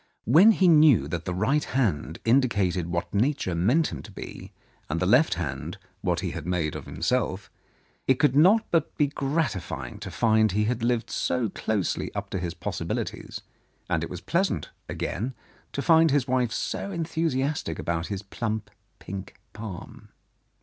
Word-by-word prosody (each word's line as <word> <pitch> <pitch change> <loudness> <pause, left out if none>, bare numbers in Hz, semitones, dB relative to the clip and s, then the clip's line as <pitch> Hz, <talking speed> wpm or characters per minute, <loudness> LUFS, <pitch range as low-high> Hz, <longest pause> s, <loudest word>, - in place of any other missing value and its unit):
When 165 - +7
he 190 -3 +3
knew 150 - +6
that 85 +1 -4
the 90 - -2
right 135 +11 +2
hand 95 - -1
indicated 100 -8 +2
what 85 +1 -3
Nature 120 - +1
meant 120 - +2
him 75 -5 -6
to - - -12
be, - - -9 0.4
and 80 +3 -1
the 90 - +1
left 120 - +4 0.6
what - - 0
he - - -2
had - - -6
made 85 -4 -1
of - - -7
himself, - - -1 0.6
it 130 - +5
could 145 -2 +3
not 190 +9 +6
but 165 -3 +1
be 150 - +4
gratifying 140 - -2
to - - -6
find 110 -3 +3
he 105 +2 +2
had 120 +2 -1
lived 120 0 0
so 120 -4 0
closely 100 -1 -2
up - - -4
to 95 - -2
his 85 -1 -4
possibilities, - - -4 0.5
and - - +1
it - - -4
was - - -7
pleasant, - - 0 0.2
again, 120 +8 -3 0.4
to 140 - -3
find 165 -1 +6
his 140 -2 +2
wife 125 -3 +1
so 195 - -3
enthu 165 -3 -2
siastic 135 - -1
about 85 0 -2
his 100 -1 -4
plump, 110 +1 -4 0.3
pink 95 0 -8 0.2
palm. 105 -4 -8
115 Hz, 165 wpm, -26 LUFS, 90-145 Hz, 0.6 s, When